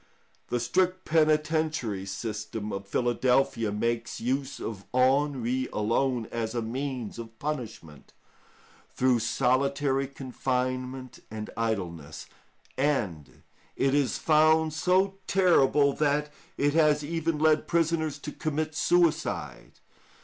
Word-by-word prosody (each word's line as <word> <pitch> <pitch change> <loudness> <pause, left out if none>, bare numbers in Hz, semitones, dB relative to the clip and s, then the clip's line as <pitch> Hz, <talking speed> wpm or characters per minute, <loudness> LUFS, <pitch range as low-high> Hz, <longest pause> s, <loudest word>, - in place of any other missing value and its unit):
The 120 - -1
strict 185 +9 0
penitentiary 155 -9 +1
system 105 +1 -5
of 100 0 -5
Philadelphia 120 0 +1
makes 115 +2 -2
use 135 +3 -2
of 100 -3 -6
ennui 130 -1 +2
alone 115 +3 0
as 115 0 -3
a 120 - 0
means 125 -1 -4
of 115 -1 -9
punishment, 115 - -6 0.8
through 125 -2 +2
solitary 135 +3 +1
confinement 130 -1 -3
and 110 0 -6
idleness, 90 -10 -3 0.5
and 105 - -1 0.3
it 135 0 +1
is 140 -5 +1
found 155 0 +3
so 190 +4 +1
terrible 145 -6 +4
that 150 0 0 0.2
it 145 0 +2
has 150 -2 +3
even 165 +1 -1
led 155 0 +3
prisoners 165 -3 +1
to 150 +1 -7
commit 155 +1 -2
suicide. 155 - 0
135 Hz, 105 wpm, -27 LUFS, 115-155 Hz, 0.8 s, terrible